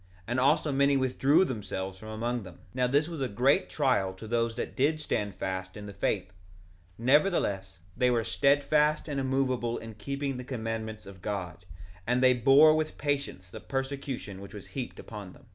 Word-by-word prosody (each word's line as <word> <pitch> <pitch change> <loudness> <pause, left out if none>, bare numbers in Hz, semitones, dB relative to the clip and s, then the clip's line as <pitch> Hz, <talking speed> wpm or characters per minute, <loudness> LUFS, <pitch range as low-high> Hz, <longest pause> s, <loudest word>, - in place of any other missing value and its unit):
And 120 +4 -1
also 145 +3 +3
many 140 0 +3
withdrew 135 +6 +3
themselves 95 - -4
from 110 - -10
among 120 +2 -2
them. 90 -4 -11
1:25 - - -22
Now 125 0 +1
this 145 +4 +2
was 165 -4 -6
a 130 - +1
great 125 +6 +2
trial 125 -10 +1
to 110 +4 -9
those 115 0 0
that 120 - -4
did 150 +4 +2
stand 105 -9 -2
fast 95 0 -4
in 105 - -8
the 100 - -8
faith; 95 -1 -1 0.6
nevertheless, 120 - +2 0.2
they 125 - +3
were 120 -2 +2
steadfast 145 - +2
and 145 -2 -2
immovable 130 -3 0
in 115 0 -8
keeping 140 +5 -3
the 125 - -6
commandments 110 -3 -4
of 95 -2 -12
God, 90 -3 -4 0.4
and 125 +1 +2
they 130 0 +7
bore 135 +6 +7
with 155 0 -2
patience 140 -11 -2
the - - -7
persecution 135 -7 -4
which 100 +1 -10
was 100 - -8
heaped 130 -3 -6
upon 105 -4 -8
them. - - -19
125 Hz, 185 wpm, -29 LUFS, 105-140 Hz, 0.6 s, they